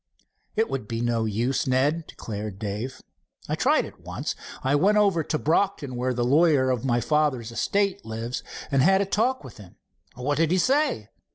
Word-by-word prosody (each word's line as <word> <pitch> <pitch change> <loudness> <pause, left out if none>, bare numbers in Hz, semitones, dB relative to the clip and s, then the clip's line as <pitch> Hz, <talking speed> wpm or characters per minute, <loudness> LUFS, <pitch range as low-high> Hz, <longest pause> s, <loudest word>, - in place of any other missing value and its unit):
"It 220 +1 +2
would 130 -5 -4
be 115 0 -3
no 120 -1 0
use, 115 +6 0
Ned," 145 +5 +1
declared 105 -2 -6
Dave. 110 +5 -5 0.4
"I - - -2
tried - - +2
it - - -12
once. - - -4 0.3
I 135 - +1
went 195 +9 +4
over 195 -6 +3
to 155 - -1
Brocton, 160 -4 0
where 125 +1 -1
the 120 0 0
lawyer 140 -1 +4
of 125 -3 -1
my 120 -3 +2
father's 130 -4 0
estate 200 +9 0
lives, 115 +3 -4 0.3
and 135 -1 +3
had 190 +6 +5
a - - +1
talk 230 +7 0
with - - -11
him." 100 -5 -14 0.4
"What 135 +4 -1
did 165 0 +3
he 185 - +2
say?" 255 - +1
135 Hz, 185 wpm, -25 LUFS, 120-175 Hz, 0.4 s, had